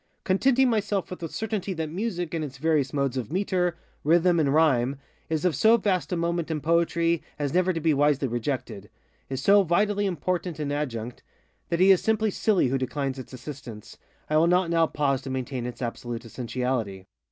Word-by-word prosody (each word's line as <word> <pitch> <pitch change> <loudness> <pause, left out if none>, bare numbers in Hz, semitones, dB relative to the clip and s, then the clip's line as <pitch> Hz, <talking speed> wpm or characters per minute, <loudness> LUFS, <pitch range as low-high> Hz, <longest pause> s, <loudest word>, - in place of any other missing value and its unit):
Contenting 255 +7 +3
myself 205 -5 -1
with 185 - -6
the 165 - -5
certainty 210 -1 -3
that 160 -2 -3
Music, 180 -3 -3
in 165 - -1
its 140 -3 -6
various 150 -3 +1
modes 140 -3 -1
of 125 -1 -4
metre, 180 -2 0 0.3
rhythm, 170 +2 +4
and 145 -3 +2
rhyme, 140 -4 +3 0.3
is 160 +1 -1
of 175 -5 +2
so 220 - +5
vast 195 -5 -1
a 180 - 0
moment 170 0 -1
in 160 -2 -1
Poetry 170 +1 +1 0.2
as 145 -2 -2
never 185 +1 +3
to 165 - -2
be 160 -1 +2
wisely 145 -1 +2
rejectedŌĆöis 120 -4 -4 0.5
so 200 +10 +5
vitally 205 +3 +1
important 180 -1 -2
an 150 -2 -3
adjunct, 125 -5 -4 0.5
that 170 - 0
he 190 +1 +7
is 190 - +5
simply 220 -1 +1
silly 195 - +2
who 135 +1 0
declines 135 +1 -3
its 130 - -9
assistance, 125 -4 -9 0.3
I 155 - +2
will 165 +2 +4
not 180 0 +2
now 165 -1 +3
pause 140 -3 0
to 135 - -7
maintain 130 -1 -3
its 125 +1 -6
absolute 120 0 -5
essentiality. 115 -5 -3
160 Hz, 185 wpm, -26 LUFS, 130-180 Hz, 0.5 s, he